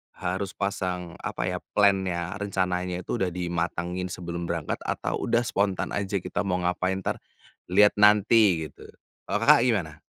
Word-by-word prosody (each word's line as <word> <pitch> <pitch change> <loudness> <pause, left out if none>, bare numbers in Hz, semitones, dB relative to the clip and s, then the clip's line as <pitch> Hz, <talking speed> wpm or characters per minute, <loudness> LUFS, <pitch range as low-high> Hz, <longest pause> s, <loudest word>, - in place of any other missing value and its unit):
harus 95 +2 -3
pasang, 90 -3 -3
apa - - -4
ya, - - -2 0.2
plan-nya, 95 -4 +2
rencananya 90 -2 -2
itu 120 - -3
udah 95 - +1
dimatangin 85 +1 -3
sebelum 85 -1 -5
berangkat, 85 -3 -3
atau - - -2
udah 120 +1 +2
spontan 100 -4 -1
aja 100 0 -2
kita 100 +2 -2
mau 90 - +1
ngapain, 90 +1 -1
ntar - - -2 0.5
lihat 105 +3 +6
nanti 105 -4 +5
gitu, - - -14 0.4
kalau 105 - 0
Kakak, 115 - +7
gimana? 80 -10 -1
90 Hz, 150 wpm, -26 LUFS, 90-100 Hz, 0.5 s, Kakak